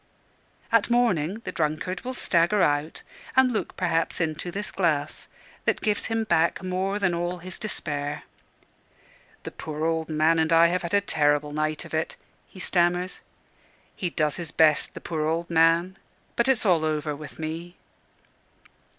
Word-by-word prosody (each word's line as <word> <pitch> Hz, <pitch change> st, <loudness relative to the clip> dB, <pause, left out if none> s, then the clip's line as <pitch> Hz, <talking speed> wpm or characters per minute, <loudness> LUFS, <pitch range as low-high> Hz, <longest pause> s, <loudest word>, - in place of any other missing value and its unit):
At 230 Hz, -1 st, +3 dB
morning, 225 Hz, -5 st, +1 dB
the -, -, -3 dB
drunkard 155 Hz, +4 st, -2 dB
will 255 Hz, +1 st, -5 dB
stagger 185 Hz, 0 st, +2 dB
out, 145 Hz, +2 st, 0 dB, 0.3 s
and 260 Hz, -1 st, +5 dB
look 215 Hz, -, -3 dB
perhaps 165 Hz, -3 st, 0 dB
into 160 Hz, +1 st, -1 dB
this 205 Hz, +4 st, -4 dB
glass, 160 Hz, -6 st, -1 dB, 0.4 s
that -, -, +2 dB
gives 210 Hz, -2 st, 0 dB
him 225 Hz, 0 st, 0 dB
back 170 Hz, -2 st, +1 dB
more 185 Hz, +2 st, -1 dB
than 190 Hz, -3 st, +1 dB
all 175 Hz, +1 st, -2 dB
his 180 Hz, +1 st, -9 dB
despair. 145 Hz, -8 st, -3 dB, 1.2 s
"The -, -, -6 dB
poor 155 Hz, 0 st, -5 dB
old 160 Hz, -1 st, -1 dB
man 155 Hz, +1 st, +3 dB
and 160 Hz, 0 st, +1 dB
I 165 Hz, 0 st, +7 dB
have 180 Hz, +1 st, 0 dB
had 170 Hz, +3 st, -1 dB
a 200 Hz, -, +4 dB
terrible 150 Hz, -5 st, +1 dB
night 155 Hz, 0 st, -2 dB
of -, -, -12 dB
it," 160 Hz, 0 st, -1 dB, 0.3 s
he 185 Hz, -, -14 dB
stammers; 180 Hz, 0 st, 0 dB, 0.7 s
"he 180 Hz, -, -2 dB
does 155 Hz, -3 st, 0 dB
his 170 Hz, -3 st, -4 dB
best 155 Hz, -2 st, +3 dB
the -, -, -7 dB
poor 155 Hz, -2 st, -2 dB
old 170 Hz, +2 st, -2 dB
man! 170 Hz, +3 st, +3 dB, 0.4 s
but 235 Hz, -, +2 dB
it's 255 Hz, -4 st, +2 dB
all 175 Hz, -5 st, +4 dB
over 150 Hz, -1 st, -1 dB
with 150 Hz, 0 st, -10 dB
me." 165 Hz, +3 st, -5 dB
170 Hz, 160 wpm, -26 LUFS, 155-185 Hz, 1.2 s, I